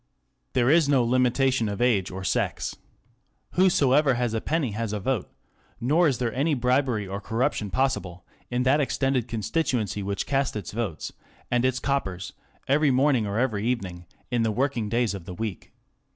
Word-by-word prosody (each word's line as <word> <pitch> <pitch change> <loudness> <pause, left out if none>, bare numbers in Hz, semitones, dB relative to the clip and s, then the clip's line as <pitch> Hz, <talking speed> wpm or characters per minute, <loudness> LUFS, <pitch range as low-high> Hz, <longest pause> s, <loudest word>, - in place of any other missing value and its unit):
There 125 +1 +3
is 160 -2 +4
no 135 -4 +4
limitation 125 -1 +2
of 100 - -4
age 110 -7 +2
or 95 +1 -6
sex. - - -1 0.8
Whosoever 145 -7 +4
has 120 -2 -1
a 110 - -1
penny 155 -7 -1
has 110 0 -3
a 105 - -2
vote; 120 0 -1 0.5
nor 155 +8 +3
is 135 -5 +1
there 120 -1 -1
any 145 +3 +1
bribery 125 -4 +1
or 100 +1 -5
corruption 110 -1 -1
possible 100 -9 -1 0.2
in 125 +1 0
that 135 +4 +3
extended 135 -3 0
constituency 115 - -1
which 100 0 -2
casts 135 -3 0
its 100 -5 -5
votes 105 -8 -4
ŌĆö - - -32 0.4
and 125 0 +2
its 130 -1 +1
coppers 95 -10 -2
ŌĆö - - -35
every 145 +2 +4
morning^ 130 -4 +3
or 100 +1 -2
every 115 -4 0
evening 90 -8 -3 0.2
in 120 -1 +1
the 115 - +2
working 120 -2 -1
days 115 -1 +1
of 95 -4 -7
the 90 - -7
week. 110 0 -5
120 Hz, 180 wpm, -26 LUFS, 105-135 Hz, 0.8 s, is